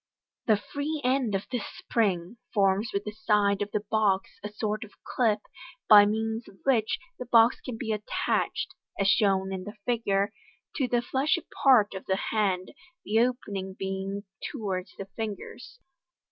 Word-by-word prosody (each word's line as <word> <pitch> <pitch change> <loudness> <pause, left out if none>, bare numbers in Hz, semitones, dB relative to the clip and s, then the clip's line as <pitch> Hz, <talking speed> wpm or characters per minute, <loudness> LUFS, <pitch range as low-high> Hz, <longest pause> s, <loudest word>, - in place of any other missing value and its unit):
The 215 -2 +5
free 285 +8 -4
end 250 -5 +1
of 195 - -2
this 245 -5 -2
spring 195 -2 0 0.2
forms 200 +2 +3
wuh 200 0 -1
the 210 - -3
side 210 -2 +2
of 205 - -1
the 210 0 -2
box 200 -3 +2
a 210 - -4
sort 215 +1 -2
of 220 - -11
clip, 220 -4 +1 0.5
by 205 -1 +9
means 220 +2 -2
of 195 - -15
which 230 -5 +2 0.2
the 250 - -6
box 230 0 +5
can 245 -3 -6
be 225 -1 -3
attached 210 0 -1 0.3
(as 195 - +2
shown 195 -1 +3
in 185 -1 -4
the 210 +4 -9
Figure) 205 -4 +1 0.4
to 270 -4 +1
the 240 -1 +1
fleshy 290 +7 0 0.2
part 245 -8 +6
of 190 - -7
the 190 - +2 0.2
hand, 195 -4 0 0.3
the 220 +2 +2
opening 205 -6 -1
being 195 +1 -3 0.3
towards 195 -7 -3
the 195 - -5
fingtrs. 220 - -6
210 Hz, 160 wpm, -28 LUFS, 195-230 Hz, 0.5 s, by